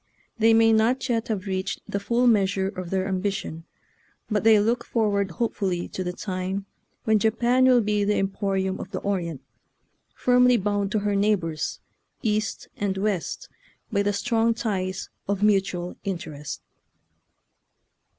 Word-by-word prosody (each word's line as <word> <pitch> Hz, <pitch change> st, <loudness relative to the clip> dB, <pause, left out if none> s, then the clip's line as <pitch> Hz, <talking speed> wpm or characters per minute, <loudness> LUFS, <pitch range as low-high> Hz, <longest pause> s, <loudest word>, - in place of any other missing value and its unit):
They 225 Hz, 0 st, +5 dB
may 225 Hz, 0 st, +5 dB
not 230 Hz, +5 st, +2 dB
yet 230 Hz, -2 st, 0 dB
have 210 Hz, -3 st, -2 dB
reached 190 Hz, 0 st, -3 dB
the 200 Hz, -, -2 dB
full 235 Hz, +5 st, +1 dB
measure 195 Hz, -4 st, +3 dB
of 185 Hz, -3 st, -6 dB
their 190 Hz, 0 st, 0 dB
ambi 195 Hz, +1 st, 0 dB
tion, 165 Hz, -4 st, -6 dB, 0.7 s
but 210 Hz, -1 st, +1 dB
they 220 Hz, -1 st, +6 dB
look 230 Hz, +4 st, +1 dB
forward 205 Hz, -4 st, 0 dB
hopefully 190 Hz, -3 st, -2 dB
to 185 Hz, -, -4 dB
the 180 Hz, -, -2 dB
time 185 Hz, +1 st, -4 dB, 0.4 s
when 220 Hz, -1 st, +3 dB
Japan 235 Hz, +4 st, +3 dB
will 250 Hz, -2 st, +6 dB
be 210 Hz, -1 st, +1 dB
the 205 Hz, +1 st, +2 dB
emporium 195 Hz, -1 st, -1 dB
of -, -, -6 dB
the 195 Hz, -, -4 dB
Orient, 170 Hz, -7 st, -2 dB, 0.7 s
firmly 250 Hz, 0 st, +4 dB
bound 205 Hz, -1 st, -1 dB
to 215 Hz, -, +2 dB
her 205 Hz, -1 st, +1 dB
neigh 210 Hz, +2 st, +4 dB
bors, 165 Hz, -5 st, -4 dB, 0.4 s
east 215 Hz, -1 st, -1 dB
and 195 Hz, -1 st, -1 dB
west, 195 Hz, -3 st, -2 dB, 0.4 s
by 200 Hz, -2 st, +2 dB
the 205 Hz, 0 st, +1 dB
strong 230 Hz, +2 st, +1 dB
ties 190 Hz, -5 st, -3 dB, 0.2 s
of 200 Hz, 0 st, -1 dB
mutual 190 Hz, -4 st, +1 dB
interest. 155 Hz, -6 st, -5 dB
200 Hz, 150 wpm, -25 LUFS, 190-220 Hz, 0.7 s, they